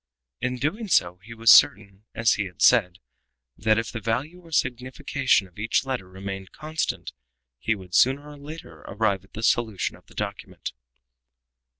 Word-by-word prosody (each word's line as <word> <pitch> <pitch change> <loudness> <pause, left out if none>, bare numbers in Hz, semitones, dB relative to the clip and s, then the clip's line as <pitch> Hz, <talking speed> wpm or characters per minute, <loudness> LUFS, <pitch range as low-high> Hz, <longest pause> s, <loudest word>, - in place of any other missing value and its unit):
In 125 0 -1
doing 175 - -2
so 90 - +2
he 115 +4 -11
was 115 -1 +6
certain, 100 0 +5
as 115 -1 +3
he 105 - -1
had 90 -2 -11
said, 100 -7 +5 0.6
that 110 +4 +2
if 115 0 -2
the 115 - -4
value 130 - -2
or 165 -2 -17
signification 130 -3 +1
of 90 +2 -17
each 115 +5 +1
letter 125 -9 -4
remained 95 0 -7
constant, 155 +1 -3 0.5
he 110 +10 0
would, 95 -3 -12
sooner 135 - +3
or 150 0 -11
later, 145 - -10
arrive 100 -2 0
at 95 - -24
the 110 - -6
solution 110 -4 +1
of - - -21
the - - -19
document. - - -5
115 Hz, 170 wpm, -25 LUFS, 95-135 Hz, 0.6 s, was